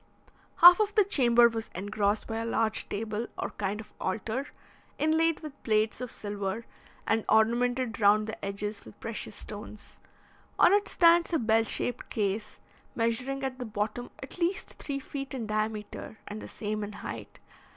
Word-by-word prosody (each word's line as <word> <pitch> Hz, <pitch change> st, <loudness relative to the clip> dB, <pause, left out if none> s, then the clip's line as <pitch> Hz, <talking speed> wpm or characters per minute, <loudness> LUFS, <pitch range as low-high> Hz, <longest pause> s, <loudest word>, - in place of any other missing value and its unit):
Half 350 Hz, +3 st, +11 dB
of 420 Hz, -1 st, +1 dB
the 425 Hz, -, +6 dB
chamber 240 Hz, -10 st, +6 dB
was 225 Hz, -1 st, -4 dB
engrossed 205 Hz, +2 st, 0 dB
by 225 Hz, -, -4 dB
a 225 Hz, -, -2 dB
large 225 Hz, -1 st, 0 dB
table, 220 Hz, +2 st, -3 dB
or -, -, -3 dB
kind 200 Hz, +1 st, -3 dB
of 220 Hz, -, -11 dB
altar, 225 Hz, +7 st, -2 dB, 0.5 s
inlaid 320 Hz, +1 st, +2 dB
with 300 Hz, -3 st, -9 dB
plates 215 Hz, +1 st, +1 dB
of 250 Hz, -, -5 dB
silver, 205 Hz, +1 st, -4 dB, 0.4 s
and 225 Hz, -1 st, +1 dB
ornamented 240 Hz, +2 st, +2 dB
round 210 Hz, +1 st, +5 dB
the 220 Hz, 0 st, -7 dB
edges 200 Hz, +1 st, -3 dB
with -, -, -14 dB
precious 225 Hz, -2 st, -5 dB
stones. 210 Hz, 0 st, -8 dB, 0.6 s
On 360 Hz, -, +6 dB
it 410 Hz, 0 st, +3 dB
stands 340 Hz, 0 st, +4 dB
a -, -, +4 dB
bell 225 Hz, -3 st, +2 dB
shaped 245 Hz, +2 st, -1 dB
case, 210 Hz, 0 st, -2 dB, 0.4 s
measuring 250 Hz, +4 st, -1 dB
at 265 Hz, -1 st, -3 dB
the 250 Hz, -, -4 dB
bottom 215 Hz, +3 st, -3 dB
at 265 Hz, -, -9 dB
least 350 Hz, +2 st, -1 dB
three 280 Hz, -2 st, -3 dB
feet 275 Hz, 0 st, -6 dB
in 240 Hz, -4 st, -3 dB
diameter, 215 Hz, 0 st, -3 dB
and 210 Hz, +1 st, -6 dB
the -, -, -8 dB
same 215 Hz, 0 st, -4 dB
in 205 Hz, +1 st, -6 dB
height. -, -, -8 dB
225 Hz, 165 wpm, -29 LUFS, 210-265 Hz, 0.6 s, Half